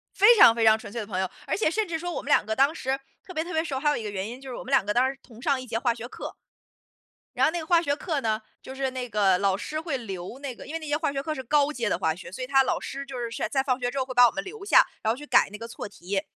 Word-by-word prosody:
非 430 +4 +7
常 230 - +9
非 230 -1 +1
常 220 0 +6
纯 205 - -10
粹 235 - -3
的 210 - -5
朋 195 -3 -4
友， 190 - -1 0.2
而 - - 0
且 405 - +2
甚 430 +5 0
至 330 -1 -2
说 350 +2 -4
我 - - -4
们 - - -9
两 - - +4
个 220 - -2
当 275 +6 +3
时 265 -3 -2 0.3
特 370 - -10
别 315 - 0
特 350 +2 -7
别 320 0 +1
熟， 275 -5 -3
还 295 - +1
有 295 - +1
一 235 - -4
个 210 - -4
原 195 0 -4
因 245 +3 -8
就 270 -1 -9
是 245 - -5
我 - - -6
们 255 - -8
两 270 -7 +4
个 205 - 0
当 255 +4 +3
时 270 - -9
同 230 -2 -15
上 275 0 +1
一 255 - -9
节 225 -1 -2
化 235 0 +1
学 230 0 -7
课。 - - -7 1.0
然 - - +4
后 - - +3
那 345 - -3
个 320 - -6
化 340 0 +5
学 285 -4 0
课 310 -3 -2
呢， 220 -3 0 0.2
就 265 - -9
是 270 0 -1
那 255 -1 -5
个 200 -4 +3
老 195 -1 +2
师 305 +10 -4
会 320 -4 -2
留 195 -2 -7
那 275 -3 -5
个 - - -12
因 - - -8
为 325 - -2
那 315 - -8
些 295 0 +1
化 310 -2 -1
学 275 -1 -2
课 310 +1 -3
是 265 - -5
高 290 +3 +2
阶 235 -6 -2
的 - - 0
化 160 - +1
学， 180 +1 -10
所 200 +8 -7
以 - - -6
他 270 +1 +5
老 - - 0
师 275 +1 -6
就 270 -2 -7
是 235 -1 -3 0.2
在 270 +1 +2
放 255 -2 0
学 245 0 0
之 275 - -4
后 260 - +1
会 255 - -7
把 245 0 +8
我 - - +1
们 295 - -3
留 400 +2 -9
下， - - +6 0.2
然 220 - +2
后 - - -5
去 295 +2 -10
改 260 -2 +4
那 210 - -8
个 230 - -6
错 230 - -7
题。 195 0 -3
260 Hz, 380 characters per minute, -26 LUFS, 225-300 Hz, 1.0 s, 常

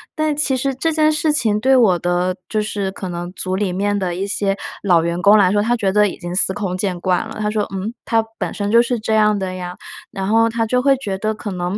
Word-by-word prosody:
但 310 -2 0
其 285 -3 +1
实 270 +1 -1
这 325 +5 0
件 310 -1 +3
事 305 0 +1
情 215 -7 +1
对 265 +3 +3
我 200 -9 +4
的 175 +1 0
就 215 - -1
是 200 -2 -3
可 190 -1 -6
能 175 +1 -5
组 185 0 -3
里 190 -2 -1
面 205 +2 0
的 180 -3 -2
一 190 +2 -2
些 200 -1 -1 0.3
老 175 -4 +4
员 170 +1 -2
工 205 +2 +6
来 185 -3 +4
说， 205 0 +2
他 235 +3 +1
觉 200 -5 0
得 210 +1 +4
已 - - -6
经 175 -1 -6
司 190 - +2
空 190 -3 -3
见 185 -2 -2
惯 180 -1 0
了， - - -9
他 210 0 0
说： 210 -1 0
“嗯？ 195 +4 -4
他 225 -1 +2
本 - - -3
身 205 0 -3
就 235 +1 +6
是 240 -1 -1
这 220 0 -1
样 210 -1 +3
的 190 -1 -3
呀。” 180 -1 -6 0.4
然 190 -1 -4
后 225 +2 +4
他 230 0 -1
就 250 +3 +1
会 275 0 +4
觉 200 -8 -4
得 215 +2 -1
可 210 -1 -6
能， 180 +1 -3
205 Hz, 285 characters per minute, -19 LUFS, 185-225 Hz, 0.4 s, 工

